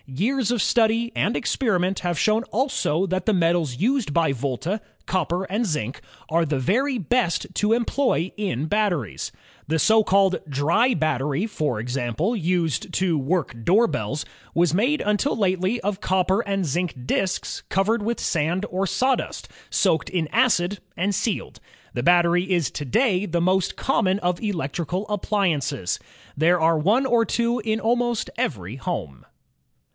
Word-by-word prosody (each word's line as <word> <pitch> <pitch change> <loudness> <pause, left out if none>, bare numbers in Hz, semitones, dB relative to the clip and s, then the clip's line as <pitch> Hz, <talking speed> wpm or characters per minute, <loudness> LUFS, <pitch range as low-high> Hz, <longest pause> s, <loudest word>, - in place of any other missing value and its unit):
Years 220 - 0
of 240 -4 +1
study 230 0 +2
and 220 +4 +1
experiment 190 -7 0
have 175 -2 -2
shown 215 +5 +2
also 225 - 0
that 185 +2 -2
the 220 - +4
metals 165 -7 +1
used 235 - 0
by 165 -5 +3
Volta, 140 - -3 0.2
copper 180 0 -1
and 205 +5 -1
zinc, 150 - -3 0.3
are 165 +1 +2
the 150 -3 -1
very 255 - +1
best 225 -2 0
to 210 +1 +1
employ 235 - 0
in 170 - -2
batteries. 175 - -1 0.4
The 160 +2 +1
so 220 +7 +4
called 195 -2 +3
"dry 165 - +2
battery," 150 - 0
for 150 - -2
example, 125 - -1
used 170 - -1
to 185 -3 +1
work 140 -5 -1
door 205 - +4
bells, 135 - -3 0.3
was 170 -2 +3
made 250 - +2
until 210 +7 0
lately 190 +2 +1
of 205 0 -2
copper 190 +2 +2
and 195 -3 -1
zinc 175 +3 -1
disks 185 +7 -1
cov 195 0 +2
ered 225 +1 +1
with 230 +3 -2
sand 170 +5 0
or 190 +2 0
sawdust, 255 +8 -1 0.2
soaked 165 -6 +1
in 175 -4 -1
acid 205 -6 +2 0.2
and 195 +4 0
sealed. 205 +1 -2 0.3
The 120 - -2
battery 175 +2 +3
is 165 -8 +1
tonday 185 - 0
the 170 - +1
most 185 +2 +1
common 195 -7 +1
of 180 -2 -1
electrical 175 - -2
ap 205 - -2
pliances. 150 - 0 0.4
There 170 +4 +3
are 165 0 +3
one 215 - +3
or 235 -3 +3
two 235 +1 0
in 220 0 -1
almost 240 0 0
every 120 - -3
home. 130 - -5
185 Hz, 155 wpm, -23 LUFS, 160-220 Hz, 0.4 s, the